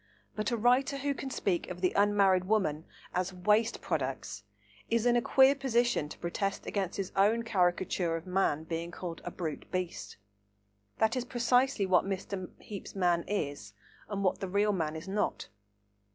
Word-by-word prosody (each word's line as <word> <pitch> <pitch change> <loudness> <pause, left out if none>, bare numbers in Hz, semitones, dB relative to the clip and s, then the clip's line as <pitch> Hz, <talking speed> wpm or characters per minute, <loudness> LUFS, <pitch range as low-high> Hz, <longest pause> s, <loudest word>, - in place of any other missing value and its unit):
But 215 +3 -1
a 235 - 0
writer 250 +5 +3
who 280 +1 -1
can 270 - -6
speak 190 -8 -1
of 180 - -6
the 185 - +2
unmarried 200 -2 +4
women 185 -7 0 0.3
as 180 +1 -1
"waste 210 +5 +2
products" 130 -8 -3 0.5
is 230 0 +1
in 240 0 +4
a 240 - +3
queer 265 +3 +5
position 240 - +1
to - - -9
protest 195 +3 -2
against 195 -3 -2
his 195 -2 -3
own 215 +4 +3
caricature 180 -4 +1
of 165 +1 -5
man 180 -5 +1
being 165 +1 -4
called 175 -1 -6
a - - -4
"brute 160 -4 -5
beast." 185 - -4 0.8
That 220 +2 +2
is 255 - -1
precisely 245 -1 +2
what 185 -2 +4
Mr. 195 -1 -4
Heape's 200 -2 -9
man 175 -3 +2
is 145 - -3 0.4
and 200 -1 -2
what 185 - +1
the 190 - -4
real 205 +2 +2
man 160 -4 -1
is 160 +4 -7
not. 200 +2 -2
195 Hz, 170 wpm, -31 LUFS, 175-225 Hz, 0.8 s, queer